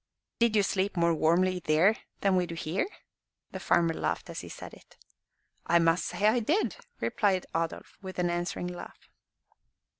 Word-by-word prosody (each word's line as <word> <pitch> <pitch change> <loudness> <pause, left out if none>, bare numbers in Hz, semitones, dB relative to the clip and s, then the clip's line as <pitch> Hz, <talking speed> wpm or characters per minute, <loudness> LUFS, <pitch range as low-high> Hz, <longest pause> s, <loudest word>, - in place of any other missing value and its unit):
"Did 235 -2 +3
you 205 - +4
sleep 195 0 -1
more 170 0 +3
warmly 180 +4 +2
than 185 +4 +1
we 180 -1 +2
do 170 - -6
here?" 165 - -1 0.6
The - - -6
farmer 170 -1 +2
laughed - - -3
as - - -5
he - - -8
said - - -9
it. - - -18 0.7
"I 170 - +5
must 165 +1 +3
say 205 - -2
I 230 +3 +4
did," 310 - +1 0.2
replied 195 -3 +1
Adolf, 165 0 -3
with 190 -1 -8
an 175 -1 +1
answering 175 +1 -2
laugh. 180 0 -9
180 Hz, 160 wpm, -29 LUFS, 170-195 Hz, 0.7 s, I